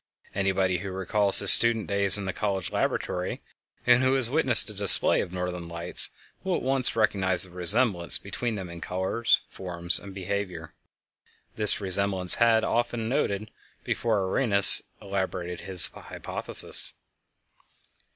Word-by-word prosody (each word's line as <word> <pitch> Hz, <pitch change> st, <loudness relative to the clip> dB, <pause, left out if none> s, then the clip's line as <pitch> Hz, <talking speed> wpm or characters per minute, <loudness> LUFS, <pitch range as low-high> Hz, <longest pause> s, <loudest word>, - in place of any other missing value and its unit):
Anybody 95 Hz, -2 st, -3 dB
who 95 Hz, 0 st, -9 dB
recalls 95 Hz, +2 st, 0 dB
his -, -, +9 dB
student 115 Hz, -2 st, 0 dB
days 100 Hz, -1 st, -2 dB
in 100 Hz, -, -8 dB
the 95 Hz, -, -6 dB
college 95 Hz, -4 st, -6 dB
laboratory -, -, -6 dB, 0.4 s
and 125 Hz, 0 st, +2 dB
who 130 Hz, +1 st, -1 dB
has 130 Hz, -3 st, -1 dB
witnessed 135 Hz, -6 st, +4 dB
a -, -, -14 dB
display 100 Hz, -1 st, +1 dB
of -, -, -9 dB
Northern 90 Hz, -1 st, -8 dB
Lights 85 Hz, 0 st, -2 dB, 0.3 s
will 190 Hz, -1 st, -4 dB
at -, -, -7 dB
once 130 Hz, -1 st, -2 dB
recognize 95 Hz, -4 st, 0 dB
the 95 Hz, -, -3 dB
resemblance 90 Hz, +1 st, +2 dB
between 115 Hz, +3 st, -8 dB
them 95 Hz, -3 st, -9 dB
in 85 Hz, -1 st, -13 dB
colors, 95 Hz, +7 st, -3 dB
forms, 85 Hz, -1 st, -1 dB
and 100 Hz, -, -14 dB
behavior. 95 Hz, -3 st, -8 dB, 0.8 s
This 105 Hz, -2 st, +6 dB
resemblance 95 Hz, -1 st, 0 dB
had 115 Hz, -1 st, +1 dB
often 120 Hz, 0 st, -4 dB
been 110 Hz, -, -7 dB
noted 105 Hz, -4 st, -5 dB, 0.3 s
before 110 Hz, -4 st, -4 dB
Arrhenius 100 Hz, -2 st, +7 dB, 0.2 s
elaborated 95 Hz, -3 st, -7 dB
his 95 Hz, -3 st, +5 dB
hypothesis. -, -, 0 dB
100 Hz, 140 wpm, -23 LUFS, 90-110 Hz, 0.8 s, his